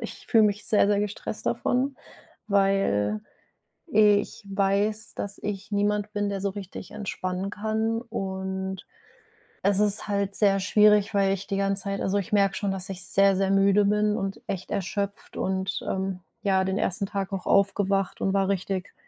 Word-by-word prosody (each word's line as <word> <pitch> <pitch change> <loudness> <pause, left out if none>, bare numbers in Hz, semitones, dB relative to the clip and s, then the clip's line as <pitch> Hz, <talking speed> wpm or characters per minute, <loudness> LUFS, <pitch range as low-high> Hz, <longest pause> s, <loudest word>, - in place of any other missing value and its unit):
ich - - -8
fühle 225 -3 +5
mich 205 0 0
sehr, 210 - +4
sehr 205 0 +2
gestresst 210 0 -4
davon, 260 +2 0 0.5
weil 195 - +2 0.7
ich 210 -1 +3
weiß, 200 +2 +1
dass 200 0 -5
ich 200 -1 -5
niemand 205 0 0
bin, 205 -1 0
der 195 - -3
so 200 - 0
richtig 195 -1 -8
entspannen 195 -2 -4
kann 220 +2 -1
und 190 -4 -4 0.8
es 200 0 +3
ist 210 0 +1
halt 200 -1 -1
sehr 195 -2 +3
schwierig, 210 +2 +4
weil 195 -1 +3
ich 195 0 -5
die 195 - -2
ganze 195 -1 0
Zeit 200 -1 -3
also 195 +1 0
ich 200 - -3
merke 200 -2 +3
schon, 200 -1 -1
dass 195 0 -3
ich 185 -1 -1
sehr 195 0 +4
sehr 190 0 +1
müde 195 +1 +4
bin 210 +1 +2
und 195 -1 -4
echt 185 -1 -4
erschöpft 200 +1 -3
und, 190 0 -1
ähm 190 -1 -2 0.2
ja, 190 -2 +2
den 190 +1 -1
1. 190 +1 -1
Tag 195 0 -4
auch 190 - -4
aufgewacht 195 -1 +1
und 195 - +1
war 195 -1 +2
richtig, 190 -1 -2
200 Hz, 170 wpm, -26 LUFS, 190-205 Hz, 0.8 s, fühle